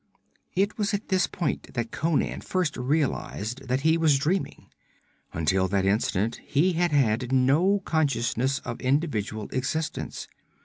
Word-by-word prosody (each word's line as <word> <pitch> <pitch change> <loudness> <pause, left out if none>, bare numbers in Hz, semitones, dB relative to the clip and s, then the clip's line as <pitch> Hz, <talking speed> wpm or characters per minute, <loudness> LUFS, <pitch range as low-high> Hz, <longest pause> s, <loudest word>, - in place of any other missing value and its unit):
It 200 +4 0
was 205 0 +1
at 205 - -6
this 185 -1 +2
point 170 -5 -3
that 120 -1 -2
Conan 160 0 0
first 180 -6 -1
realized 130 -3 -2
that 130 +2 0
he 160 +2 +3
was 155 -4 +4
dreaming. 165 +7 -1 0.7
Until 95 +4 +1
that 95 0 0
instant 105 +2 0
he 165 +6 +2
had 175 0 +1
had 125 -3 +2
no 150 +10 +3
consciousness 135 -4 +1
of - - -5
individual 130 -7 -1
existence. 155 +5 -3
140 Hz, 135 wpm, -26 LUFS, 120-165 Hz, 0.7 s, was